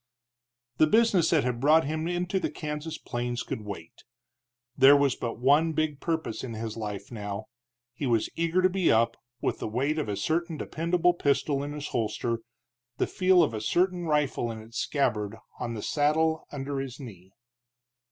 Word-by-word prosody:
The 155 - +5
business 210 -4 +4
that 160 -4 +3
had 125 -1 -1
brought 155 +4 +5
him 155 +2 -2
into 180 +2 -1
the - - -1
Kansas 155 0 -5
plains 120 0 -3
could - - -5
wait; 100 -6 -9 0.7
there 135 +1 +8
was 140 -2 +3
but 115 -2 -4
one 145 +6 +3
big 155 -2 -1
purpose 160 -9 -2
in 120 -3 -5
his 110 0 -4
life 105 -2 -5
now. 105 -1 -5 0.5
He 135 +2 -3
was 115 -3 +2
eager 170 +2 +1
to - - +7
be 185 -2 +2
up, 115 +1 +3 0.3
with - - -1
the - - -3
weight 135 +8 0
of 145 - -2
a 100 - -1
certain 160 - -1
dependable 170 +3 +1
pistol 140 -3 +1
in 145 +1 -4
his 150 0 -5
holster, 115 0 -1 0.6
the - - +2
feel 185 -1 +4
of 145 - 0
a 110 - -3
certain 180 - +1
rifle 150 -6 +1
in 110 -1 -5
its 115 +3 -7
scabbard 110 -7 0 0.2
on 120 -2 -3
the 105 - -5
saddle 160 +2 +1
under 140 -1 -3
his 135 -1 -6
knee. 95 -8 -11
140 Hz, 180 wpm, -28 LUFS, 115-160 Hz, 0.7 s, there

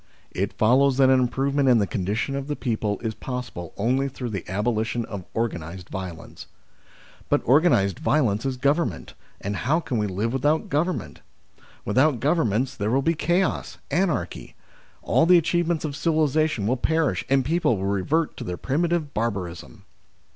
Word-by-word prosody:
It 95 +2 -2
follows 130 +4 +3
that 135 -1 +5
an 130 - +5
improvement 135 +2 +1
in 125 - +6
the 105 - +2
con 95 0 -3
dition 110 +8 -1
of 140 0 -4
the 150 - -2
people 110 -6 -2
is 110 -2 -2
possible 125 -9 -6
only 130 +6 +1
through 125 -2 -6
the 100 -4 -4
abolition 110 +3 -1
of 100 -4 -7
organised 90 -6 -3
violence. 95 -3 -7 0.8
"But - - +2
organised 125 - +3
violence 125 -9 +1
is 135 -2 -2
government, 140 - 0 0.3
and 100 +1 -3
how 155 +6 +1
can 130 -8 -2
we 105 - 0
live 105 +5 -2
without 145 +4 +1
Governments? 165 +6 -2 0.6
With 105 +5 +1
out 145 -3 +3
Governments 130 - +1
there 105 0 -2
will 135 +4 +2
be 165 - +2
chaos, 175 +4 0
anarchy; 175 +2 -1 0.5
all 165 - +3
the 180 0 +7
achievements 170 -1 0
of 145 -2 -4
civilisation 155 - +1
will 125 +5 +1
perish 160 +3 +1
and 135 -1 +3
people 155 - +1
will 95 - -3
revert 100 - 0
to - - -5
their 90 0 -4
primitive 160 +1 -1
barbarism." 90 - -4
130 Hz, 165 wpm, -24 LUFS, 105-150 Hz, 0.8 s, the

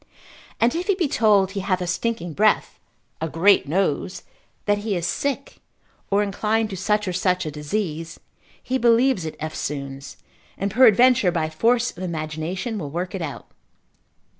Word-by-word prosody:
And 235 +1 +3
if 350 +3 -3
he 400 - +3
be 355 -5 0
told 205 -6 +3
he 200 - -4
hath 185 -1 0
a 180 - -3
stinking 185 -1 -2
breath, 215 +6 +2 0.4
a 160 - -2
great 185 +2 +4
nose, 185 +2 -1 0.4
that 205 0 +2
he 205 -1 -2
is 170 -1 -2
sick, 275 +8 -2 0.5
or 205 +1 +3
inclined 215 +2 0
to - - -4
such 210 +2 0
or 185 - -1
such 180 0 +1
a 155 - -3
disease, 165 +1 -4 0.4
he 260 +1 -1
believes 235 -4 +3
it 155 - -6
eftsoons, 140 -3 -5 0.4
and 200 +1 -2
peradventure 240 -2 +5
by 160 -2 -1
force 235 +8 +2
of 175 - -10
imagination 170 +6 -4
will 150 -6 -5
work 175 +5 -4
it 190 - -4
out. 150 -4 -6
195 Hz, 165 wpm, -23 LUFS, 165-225 Hz, 0.5 s, peradventure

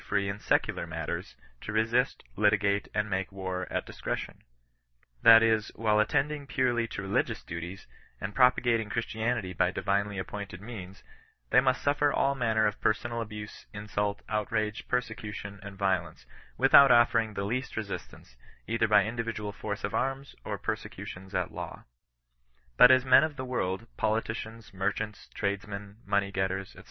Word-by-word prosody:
free 100 -1 -1
in 100 +1 -3
ieeular - - 0
matters, - - -4 0.3
to - - -5
resist, 110 +3 +1
litigate^ 105 -1 +2
and 105 0 0
make 95 -1 -2
war 95 -1 -4
at - - -1
dkscretioiL - - -5 0.8
That 115 0 +9
is, 110 -1 +2
while 105 -1 +2
attending 145 +5 0
purely 120 -3 +1
to 100 - -5
reli 100 0 +2
gious - - -8
duties, 85 +3 -6 0.3
and 100 +2 -5
propagating 120 -3 +3
Christianity 110 -3 -2
by 90 0 +2
divinely 100 +1 -1
appointed 95 -1 -6
means, 100 -3 -9 0.5
they 125 - +7
must 130 0 +1
simer 145 0 +2
all 140 - +2
manner 115 -4 +1
of 105 -1 -1
personal 115 +2 0
aouse, 105 -1 -9
insult, 105 0 -2
outrage, 105 0 -2
persecution, 105 -4 -3
and 100 -1 -9
violence, 90 -9 -1 0.3
without 135 +1 +8
offering 115 -2 +4
the 100 - -2
least 125 +6 -3
resistance, 100 - -6 0.3
either 115 0 +1
by 105 -2 +5
individual 115 -2 -3
force 105 0 -5
of - - -2
arms 135 +1 -2
or - - -3
prosecutions 95 +1 -6
at - - -1
law. - - -7 0.9
But 125 - +9
as 130 0 +5
men 135 +2 +7
of 155 -2 -2
the 130 - -5
world^ 105 -5 -2
politicians, 110 0 -2
merchants, 105 +2 -3
tradesmen, 100 0 -4
money 100 -1 +1
getters, 95 0 -2
&c. - - -14
105 Hz, 150 wpm, -29 LUFS, 100-115 Hz, 0.9 s, That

